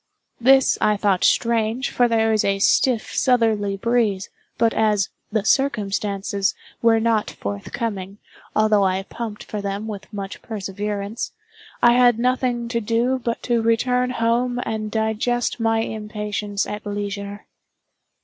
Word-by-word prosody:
This 265 +2 +5
I 210 -1 +3
thought 200 -3 +1
strange, 230 +2 +1
for 245 - +3
there 225 -1 +2
was 215 -1 +2
a 195 0 +1
stiff 230 +3 +2
southerly 220 -6 +2
breeze; 215 -3 0 0.3
but 230 -1 +3
as 210 -3 +2 0.2
"the 215 -1 0
circumstances" 200 -6 0 0.3
were 230 -1 +4
not 220 -1 +1
forthcoming, 190 - -5 0.4
although 215 -1 +4
I 190 0 +1
pumped 220 0 -6
for 210 - -5
them 200 +1 -3
with 210 -2 -7
much 200 -2 -6
perseverance, 205 0 -4 0.5
I 240 - +7
had 245 -2 +5
nothing 245 -1 0
to 235 -1 -1
do 235 +4 +1
but 235 -1 -2
to 240 -2 +1
return 250 +2 +1
home 245 +1 0
and 215 -1 -3
digest 220 +3 -1
my 225 0 +2
impatience 210 -2 -3
at 210 0 -6
leisure. 205 0 -5
220 Hz, 135 wpm, -22 LUFS, 205-235 Hz, 0.5 s, I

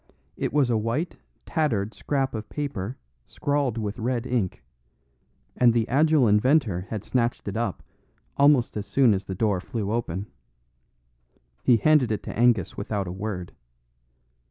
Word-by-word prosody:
It - - -2
was 140 -4 +2
a 115 - +2
white, 120 +11 -2 0.3
tattered 115 - 0
scrap 135 -2 -1
of 110 -1 -6
paper 130 -6 -4 0.3
scrawled 140 -5 -1
with 105 0 -3
red 120 +1 -1
ink; 110 - -2 0.9
and 120 -2 +4
the 115 -2 +2
agile 150 -1 +4
inventor 105 - +2
had 105 -3 -4
snatched 120 -3 -1
it 100 - -3
up 115 +1 -2 0.5
almost 140 -4 +4
as 105 -1 -4
soon 130 -5 +4
as 95 0 -2
the 95 - -5
door 100 -2 +1
flew 105 0 -3
open. 100 -5 -2 1.4
He 120 - +5
handed 140 -1 +3
it 105 -2 -2
to - - -6
Angus 115 -6 +2
without 100 -1 -3
a - - -4
word. 95 -2 -5
115 Hz, 150 wpm, -25 LUFS, 100-130 Hz, 1.4 s, He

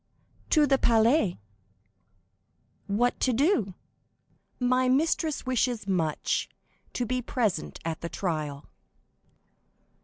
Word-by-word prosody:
"To 305 -2 +5
the 270 -1 +2
Palais." 225 - +3 1.5
"What 235 +5 +1
to 260 - +2
do?" 245 - +1 0.8
"My 255 0 +2
mistress 315 +3 +1
wishes 245 -4 0
much 165 -6 0 0.4
to 245 - -1
be 255 +2 -1
present 220 -9 -2
at 165 -1 -3
the 170 - -4
trial." 155 -7 -3
240 Hz, 95 wpm, -27 LUFS, 185-255 Hz, 1.5 s, To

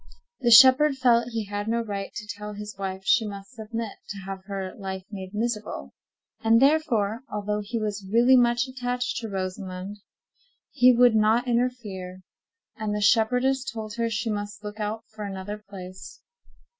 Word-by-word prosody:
The 240 - +1
shepherd 265 +4 +8
felt 240 -3 +3
he 225 -2 -3
had 205 +1 -4
no 230 +1 +1
right 200 -3 -5
to 210 - -5
tell 210 0 -6
his 210 0 -7
wife 190 -1 -5
she 245 +2 +4
must 200 +2 -8
submit 225 -2 -6
to 200 - -5
have 190 -1 -7
her 195 -2 -5
life 190 -1 -6
made 190 -1 -7
miserable, 210 - -3 0.5
and 225 +1 +5
therefore, 255 -7 +2
although 210 0 -2
he 230 +3 -4
was 205 -3 -4
really 240 +3 +6
much 240 0 +3
attached 250 -1 -3
to 225 -1 -4
Rosamond, 185 0 -5 0.7
he 250 0 +6
would 245 -1 +5
not 220 +3 +3
interfere; 215 -7 -2 0.5
and 215 -3 -3
the - - -1
shepherdess 250 +5 +3
told 220 -4 -6
her 230 0 0
she 225 0 -2
must 205 0 -5
look 210 +1 -7
out 215 +2 -3
for 215 -1 -9
another 200 +1 -5
place. 185 -1 -10
215 Hz, 165 wpm, -26 LUFS, 200-240 Hz, 0.7 s, shepherd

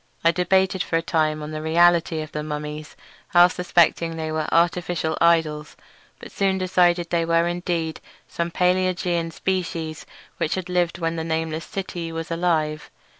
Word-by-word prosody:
I 165 - +5
debated 190 +2 +1
for 165 - 0
a 165 - -2
time 155 -2 0
on 150 - -6
the 155 0 -5
reality 165 0 +3
of 155 - -11
the 150 - -4
mummies, 150 0 -6 0.4
half 175 +1 +7
suspecting 170 -2 +2
they 160 -1 -3
were 155 -1 -2
artificial 170 -1 +1
idols; 160 -3 +2 0.4
but - - -11
soon 195 -1 +1
decided 175 -2 +2
they 170 -1 +2
were 165 +1 +2
indeed 175 -2 -2 0.3
some 170 0 -3
palaeogean 180 -1 0
species 165 -3 -3 0.3
which 155 - -1
had 185 -1 -5
lived 175 -2 0
when 165 -1 -2
the 160 - -2
nameless 160 0 -2
city 175 -4 -5
was 165 0 -5
alive. 160 -3 0
165 Hz, 160 wpm, -23 LUFS, 160-175 Hz, 0.4 s, half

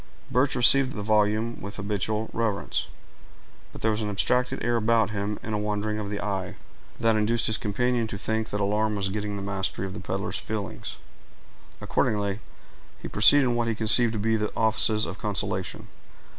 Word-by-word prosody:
Birch 130 +2 +2
received 130 +2 +5
the 105 - -5
volume 110 +2 +1
with 100 +1 -7
habitual 105 +1 -2
reverence; 110 -3 -1 0.8
but - - -11
there 110 - +3
was 110 +1 -2
an 105 - -2
abstracted 125 +5 0
air 120 - +2
about 110 -1 +2
him, 105 0 -3
and 110 - -4
a 105 - 0
wandering 105 0 -2
of 100 -1 -4
the 100 0 -3
eye, 100 -3 -3 0.4
that 115 -1 +3
induced 110 +2 +1
his 110 - +3
companion 120 +3 0
to 100 - -6
think 110 +2 -2
that 105 - -3
alarm 105 +2 +1
was 100 -1 -1
getting 105 +1 -3
the 100 - -5
mastery 95 -1 -2
of 95 - -6
the - - -6
peddler's - - -3
feelings; - - -5 0.8
accordingly, 100 -1 0 0.6
he - - -6
proceeded 140 +7 +6
in 125 -2 +1
what 120 -1 0
he 115 - 0
conceived 110 +2 +4
to - - -2
be 110 +2 +1
the 105 -1 -1
offices 110 -1 +3
of 95 - -7
consolation. 105 -5 -3
105 Hz, 185 wpm, -26 LUFS, 105-115 Hz, 0.8 s, proceeded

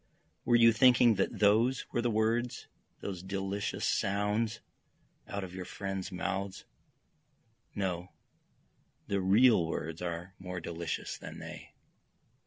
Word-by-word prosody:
Were 120 - +4
you 115 0 +7
thinking 125 0 +6
that - - 0
those 110 +5 +3
were 120 - 0
the 120 - +1
words, 115 +2 0 0.4
those 95 -3 -5
delicious 95 +1 -3
sounds 105 +3 0 0.7
out 100 -1 -4
of 90 -1 -7
your 95 0 -5
friends' 95 0 -5
mouths? 95 +1 -3 1.1
No, 90 -3 -2 1.0
the 100 -1 0
real 105 +1 +5
words 80 0 -4
are 90 +1 -4
more 90 -1 -5
delicious 85 -1 -4
than - - -8
they. - - -10
100 Hz, 120 wpm, -31 LUFS, 90-110 Hz, 1.1 s, you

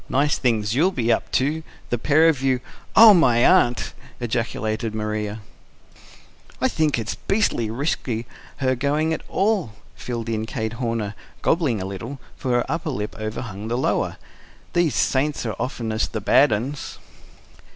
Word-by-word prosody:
"Nice 145 +2 +2
things 110 -4 +1
you'll 160 +9 +3
be 120 -10 0
up - - 0
to, 150 +5 +1 0.3
the 120 - 0
pair 155 +6 +4
of 150 -5 +2
you 130 -2 +2 0.4
oh, 220 -1 +10
my 125 -10 +4
aunt!" 120 0 +3 0.3
ejaculated 110 -2 -2
Maria. 105 0 -3 1.2
"I - - +3
think 155 -4 +1
it's 115 -1 -3
beastly 195 - 0
risky 120 -2 -2 0.3
her 130 -1 +1
going 145 +5 0
at - - -3
all," 195 - +1 0.2
filled 120 -2 -5
in 110 -1 -2
Kate 110 -3 -3
Horner, 115 -4 -2 0.3
gobbling 150 - +2
a 95 - -4
little; 110 +8 -6 0.2
for 130 - -5
her 120 0 +2
upper 160 +2 -2
lip 105 -7 -4
overhung 110 -1 -5
the 120 +2 -1
lower. 130 - 0 0.6
"These 175 -4 +2
saints 140 0 +1
are 110 - -2
oftenest 115 -3 -2
bad 145 -3 +5
'uns." 130 +7 -3
120 Hz, 150 wpm, -23 LUFS, 110-145 Hz, 1.2 s, oh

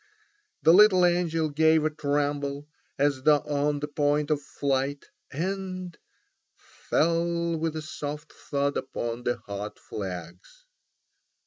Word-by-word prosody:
The 165 - +7
little 190 -2 +7
angel 170 -3 +1
gave 160 +1 +3
a 155 - +1
tremble 145 -1 -1 0.3
as 140 -1 +1
though 150 +1 +4
on 145 0 -1
the 150 - -2
point 145 0 0
of 150 -1 +1
flight, 140 0 -2 0.3
and—fell 185 +2 -4 1.6
with 160 0 -2
a 155 - -4
soft 150 0 -6
thud 140 0 -2
upon 120 -2 -4
the 120 - +1
hot 100 +1 -6
flags. 90 - -8
145 Hz, 115 wpm, -27 LUFS, 140-160 Hz, 1.6 s, The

